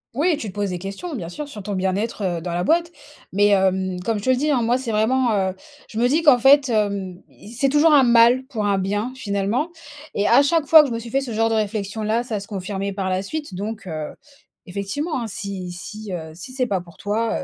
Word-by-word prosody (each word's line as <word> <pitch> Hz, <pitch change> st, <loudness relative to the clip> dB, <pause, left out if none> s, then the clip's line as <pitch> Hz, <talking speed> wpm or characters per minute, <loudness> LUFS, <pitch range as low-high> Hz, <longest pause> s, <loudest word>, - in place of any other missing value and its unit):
Oui! 310 Hz, +3 st, +2 dB
Tu 215 Hz, -, -5 dB
te -, -, -10 dB
poses 205 Hz, -2 st, -1 dB
des 180 Hz, -, -4 dB
questions, 195 Hz, -, -6 dB
bien 175 Hz, -8 st, -5 dB
sûr, 295 Hz, +11 st, -6 dB
sur 215 Hz, -8 st, -9 dB
ton 205 Hz, +1 st, -5 dB
bien-être, 195 Hz, +3 st, -1 dB
heu, 175 Hz, -3 st, -1 dB
dans 175 Hz, +1 st, -4 dB
la 175 Hz, +1 st, -1 dB
boîte, 335 Hz, -, +2 dB, 0.4 s
mais 205 Hz, +2 st, +3 dB
hem, 190 Hz, -2 st, +1 dB
comme 220 Hz, +2 st, 0 dB
je 205 Hz, -, -6 dB
te -, -, -1 dB
le -, -, +4 dB
dis, 300 Hz, +4 st, 0 dB
hein, 255 Hz, -5 st, +2 dB
moi, 240 Hz, +3 st, +2 dB
c'est 250 Hz, -3 st, -4 dB
vraiment, 235 Hz, +3 st, +2 dB
heu, 190 Hz, -1 st, 0 dB, 0.3 s
je 220 Hz, -, -5 dB
me 245 Hz, -, +4 dB
dis 315 Hz, +5 st, +1 dB
qu'en 280 Hz, -6 st, +6 dB
fait, 270 Hz, +1 st, +5 dB
hem: 200 Hz, -4 st, -1 dB
«I 215 Hz, -, -14 dB
c'est 270 Hz, +3 st, +1 dB
toujours 300 Hz, +2 st, +4 dB
un 285 Hz, -, +7 dB
mal 240 Hz, +1 st, +5 dB
pour 220 Hz, -6 st, -3 dB
un 200 Hz, -1 st, +2 dB
bien 205 Hz, +6 st, -2 dB
finalement» 210 Hz, -, -1 dB, 0.5 s
et 205 Hz, -, +1 dB
à 240 Hz, -, +6 dB
chaque 300 Hz, +2 st, +2 dB
fois 315 Hz, +1 st, +9 dB
que 295 Hz, -, 0 dB
je 240 Hz, -, -4 dB
me 230 Hz, -, -2 dB
suis 230 Hz, 0 st, -9 dB
fait 275 Hz, -, +1 dB
ce 250 Hz, -4 st, -6 dB
genre 225 Hz, +1 st, +1 dB
de -, -, 0 dB
réflexion 215 Hz, 0 st, -2 dB
là 220 Hz, +3 st, 0 dB
ça 220 Hz, -4 st, -3 dB
se 195 Hz, -, -10 dB
confirmait 195 Hz, 0 st, -4 dB
par 190 Hz, -1 st, -2 dB
la 185 Hz, 0 st, 0 dB
suite 295 Hz, +3 st, -5 dB
donc, 205 Hz, +3 st, -5 dB
heu, 155 Hz, -3 st, -5 dB, 0.5 s
effectivement, 240 Hz, -, -3 dB
hein, 230 Hz, -, -3 dB
si 195 Hz, -3 st, -5 dB
si, 210 Hz, +3 st, -8 dB
heu, 160 Hz, -3 st, -5 dB
si 180 Hz, +10 st, -9 dB
c'est 255 Hz, -1 st, 0 dB
pas 190 Hz, -4 st, -1 dB
pour 170 Hz, -3 st, -16 dB
toi, 220 Hz, +2 st, -1 dB
215 Hz, 255 wpm, -22 LUFS, 195-255 Hz, 0.5 s, fois